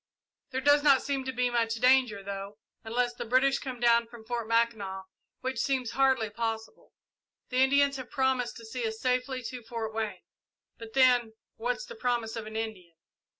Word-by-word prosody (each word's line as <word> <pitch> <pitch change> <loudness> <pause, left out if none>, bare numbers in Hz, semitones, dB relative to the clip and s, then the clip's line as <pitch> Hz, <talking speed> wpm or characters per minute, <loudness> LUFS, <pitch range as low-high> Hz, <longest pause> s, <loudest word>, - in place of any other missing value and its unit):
There 260 -1 -2
does 290 +2 +5
not 280 -3 +5
seem 275 -2 -2
to 260 - -2
be 250 0 0
much 230 -1 +1
danger, 250 -4 +3
though, 200 +1 -6 0.3
unless 240 +2 0
the - - -5
British 260 +4 +3
come 260 -3 -6
down 235 -1 +4
from 230 -1 -13
Fort 235 -1 -3
Mackinac, 220 -5 0 0.4
which 260 -2 -3
seems 255 -3 0
hardly 265 -5 +2
possible. 225 0 -4 0.6
The 255 - -2
Indians 280 +1 +4
have 255 -2 -8
promised 265 -2 0
to 230 - -11
see 230 +1 -3
us 220 0 -5
safely 255 +1 -1
to 245 +2 -6
Fort 225 -1 -5
Wayne, 220 -1 -3 0.6
but 225 -1 -10
then 250 -4 +4 0.2
what's - - -2
the 485 - -9
promise 240 - -1
of 225 -2 -5
an 220 - -8
Indian?" 205 -7 -5
240 Hz, 180 wpm, -29 LUFS, 225-260 Hz, 0.6 s, does